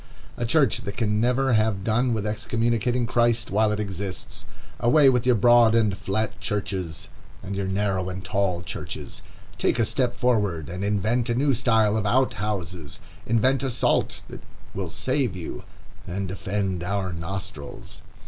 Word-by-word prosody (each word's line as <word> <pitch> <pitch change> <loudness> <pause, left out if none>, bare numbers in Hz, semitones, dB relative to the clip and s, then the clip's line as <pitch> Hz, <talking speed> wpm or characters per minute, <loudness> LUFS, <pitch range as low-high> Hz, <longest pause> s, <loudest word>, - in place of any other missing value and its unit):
A 120 - -2
church 140 -2 +3
that 100 - -6
can 105 -3 +1
never 125 +2 +2
have 110 -3 +1
done 120 +4 +1
with 110 -3 -1
excommunicating 115 +2 0
Christ 120 -2 +1
while 105 +1 +3
it 105 - -2
exists! 95 -2 -4 0.3
Away 140 +3 +5
with 125 -1 +1
your 125 - +5
broad 120 +1 +5
and 110 -4 +3
flat 110 +3 -2
churches, 95 -5 -3 0.4
and 100 - -4
your 95 -1 -2
narrow 95 -1 0
and 95 +1 -6
tall 95 -4 0
churches! - - -7 0.4
Take - - +2
a 115 - +3
step 125 +1 +1
forward, 105 - 0
and 90 +3 -4
invent 110 +4 0
a 120 - +1
new 140 +2 +2
style 110 -3 +3
of 105 -1 -1
out 130 +5 +2
houses. 90 -7 -4 0.3
Invent 125 +4 +2
a 135 - -1
salt 120 - 0
that - - -10 0.3
will 95 -3 -4
save 130 - 0
you, 85 -3 -7 0.4
and 95 +2 -3
defend 95 0 -2
our 95 0 -2
nostrils. 85 -3 -7
105 Hz, 160 wpm, -25 LUFS, 95-120 Hz, 0.4 s, Away